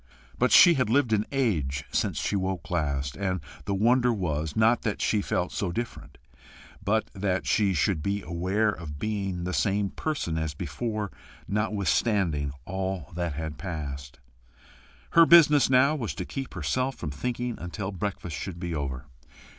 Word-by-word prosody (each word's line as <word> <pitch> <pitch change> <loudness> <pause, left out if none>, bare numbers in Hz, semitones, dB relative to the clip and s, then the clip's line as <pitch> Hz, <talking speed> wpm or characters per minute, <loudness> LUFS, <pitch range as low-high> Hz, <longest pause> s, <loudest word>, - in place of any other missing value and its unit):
But 125 - +3
she 175 - +9
had 130 -8 0
lived 125 -2 +3
an 105 0 +1
age 85 - 0
since - - 0
she - - -1
woke 95 -2 -2
last; 70 -4 -1
and 95 -2 -1 0.3
the 100 - -1
wonder 120 +4 +3
was, 80 -7 -2
not 115 +2 +4
that 105 - -2
she 105 - +1
felt 90 -2 -1
so 95 -4 -2
different, 80 -10 -6 0.7
but 110 +3 0
that 95 -5 -1
she 95 +7 +2
should 85 +1 +1
be 100 +5 -2
aware 95 +6 0
of 75 -7 -7
being 95 -1 -2
the 90 +1 -3
same 100 -1 +1
person 115 - -2
as 80 -2 -3
before 105 - -3 0.4
notwithstanding 100 -7 +1
all 95 -4 -3
that 85 -2 -2
had 80 +1 -5
passed. 70 -7 -6 0.9
Her 165 -1 +7
business 150 -5 +7
now 130 +3 +5
was 120 -8 -3
to 90 - -4
keep 135 -1 -6
herself 125 - -1
from 75 - -5
thinking 120 - -3
until 95 +4 -4
breakfast 95 -4 -4
should 90 +2 -6
be 85 -1 -3
over. 70 -2 -3
95 Hz, 160 wpm, -27 LUFS, 80-110 Hz, 0.9 s, she